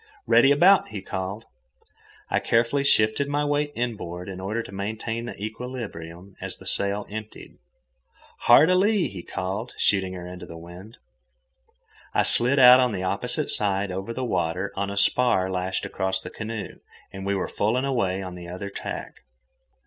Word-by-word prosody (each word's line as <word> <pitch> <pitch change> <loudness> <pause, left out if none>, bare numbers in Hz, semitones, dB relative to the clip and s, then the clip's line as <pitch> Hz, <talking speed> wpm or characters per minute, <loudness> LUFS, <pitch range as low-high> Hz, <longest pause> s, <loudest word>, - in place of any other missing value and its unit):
"Ready 135 - +5
about!" 180 +7 +5
he 105 - -6
called. 95 +4 -5 0.8
I - - +1
carefully 120 +5 +1
shifted 110 +1 +3
my 145 +1 0
weight 145 0 0
inboard 100 -7 -4
in 95 -1 -7
order 105 +5 -3
to - - -11
maintain 110 +4 -4
the 120 - -8
equilibrium 100 -6 -7
as - - -2
the - - -14
sail 100 +1 +1
emptied. 110 +1 -9 0.9
"Hard 140 +8 +7
a - - +4
lee!" 200 0 +2
he 95 -3 -8
called, 95 +7 -5
shooting 95 -2 +1
her 90 -1 -7
into 90 0 -9
the 85 - -9
wind. 90 +6 -12 1.2
I - - +4
slid 125 +4 +4
out 125 -1 +9
on 125 -3 +2
the 95 -2 -3
opposite 125 - 0
side 100 -1 +1
over 95 +4 -4
the 125 +2 -3
water 90 0 -1
on 100 0 -2
a 100 - -5
spar 100 -3 +3
lashed 95 +1 -2
across 95 -1 -1
the - - -7
canoe, 110 -1 -6 0.3
and 95 0 -7
we 100 +1 0
were 95 - -2
full 110 +4 0
and 130 - 0
away 95 -8 0
on 90 -1 -7
the 90 -1 -9
other 95 +3 -6
tack. - - -6
100 Hz, 170 wpm, -25 LUFS, 95-125 Hz, 1.2 s, out